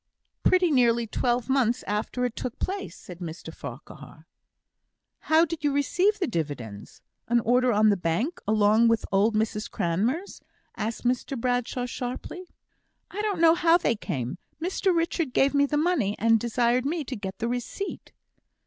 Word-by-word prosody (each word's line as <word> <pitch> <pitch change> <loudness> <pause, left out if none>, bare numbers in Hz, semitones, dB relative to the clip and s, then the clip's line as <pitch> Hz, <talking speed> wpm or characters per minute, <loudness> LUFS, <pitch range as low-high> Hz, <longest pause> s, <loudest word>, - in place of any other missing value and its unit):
"Pretty 365 -2 +3
nearly 235 -3 +3
twelve 240 +2 -1
months 255 -3 +1
after 215 +4 -2
it 245 - -3
took 250 - -5
place," 390 +1 -4
said 180 -1 -11
Mr 165 -2 -7
Farquhar. 140 +3 -10 0.9
"How 320 +1 +4
did 320 -1 -6
you 290 - +2
receive 360 +9 +2
the 385 - 0
dividends? 140 - -5 0.2
An 240 +1 +3
order 250 +2 +3
on 215 0 +4
the 205 - +3
Bank, 180 - -1
along 215 +2 +4
with 230 -1 +2
old 205 +3 +3
Mrs 215 0 -1
Cranmer's?" 225 - -1 0.3
asked 220 +2 -4
Mr 250 +1 -1
Bradshaw, 245 0 -1
sharply. 255 +9 -6 0.6
"I 415 - -3
don't 410 -5 -1
know 325 -1 +7
how 335 -1 +4
they 285 - 0
came. 135 - -4 0.2
Mr 375 +3 0
Richard 330 -4 0
gave 275 +1 +3
me 285 0 +3
the 295 - 0
money, 295 - +1
and 225 0 +3
desired 240 +2 +1
me 320 +1 -1
to 260 -1 -5
get 195 -2 -6
the 230 - -2
receipt." 245 +11 -5
245 Hz, 160 wpm, -26 LUFS, 210-310 Hz, 0.9 s, know